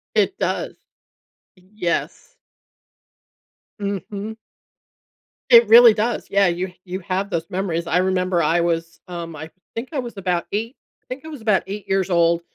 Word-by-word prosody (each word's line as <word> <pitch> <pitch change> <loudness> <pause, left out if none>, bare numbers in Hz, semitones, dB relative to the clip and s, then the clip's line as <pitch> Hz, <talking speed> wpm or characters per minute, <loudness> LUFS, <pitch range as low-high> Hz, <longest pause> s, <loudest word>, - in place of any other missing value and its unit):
It - - +2
does. - - -2 0.8
Yes. 205 - -4 1.4
Mhm. 200 +2 -4 1.2
It 235 -2 +8
really 230 +1 +9
does, 225 +3 -2
yeah, 200 -1 +4
you 180 +1 -2
you 185 +1 -5
have 190 +2 -2
those 165 -3 -2
memories. 175 -3 -2
I 170 +1 +1
remember 185 -1 +1
I 170 +2 +2
was, 165 -1 -2
um, 170 -2 -6
I 155 +2 -8 0.3
think 235 +3 -4
I 290 - -2
was 240 -4 -6
about 180 -3 -1
eight 225 +5 -3 0.3
I - - -49
think 260 +3 -7
I - - -10
was 300 -6 -8
about 215 -4 +2
eight 200 +1 -6
years 195 -1 0
old, 170 -1 +3
190 Hz, 155 wpm, -21 LUFS, 170-215 Hz, 1.4 s, really